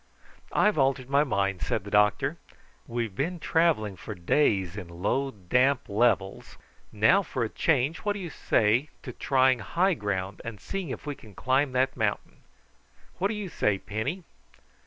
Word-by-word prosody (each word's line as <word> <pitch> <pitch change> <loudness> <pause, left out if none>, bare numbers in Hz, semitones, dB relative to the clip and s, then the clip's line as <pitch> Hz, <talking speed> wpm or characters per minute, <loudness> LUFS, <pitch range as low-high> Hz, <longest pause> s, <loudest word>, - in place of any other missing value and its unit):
"I've 210 -6 +3
altered 135 -1 +1
my 140 +1 +5
mind," 100 -8 -1
said 110 - -1
the 100 - -9
doctor. 105 0 +2 0.5
"We've 115 -3 -3
been 170 - -2
travelling 155 - +1
for 105 - -7
days 95 - +1
in 100 -4 -6
low 100 +11 -1
damp 125 +6 +1
levels; 100 -2 0 0.3
now 110 - +4
for 130 -9 -3
a 110 - -2
change 150 +3 +1
what 205 -1 -1
do 205 - -6
you 175 -4 -6
say 115 +6 +2
to 125 - -7
trying 130 -1 +2
high 185 +9 +1
ground 95 - -3
and 115 -3 -7
seeing 195 -5 -5
if - - -6
we 145 - -3
can 110 -7 -16
climb 130 +1 +1
that 130 +1 +1
mountain? - - -2 0.8
What 195 - +2
do 215 - -3
you 210 -2 -4
say, 105 - 0
Penny?" 110 - -4
125 Hz, 165 wpm, -27 LUFS, 105-150 Hz, 0.8 s, my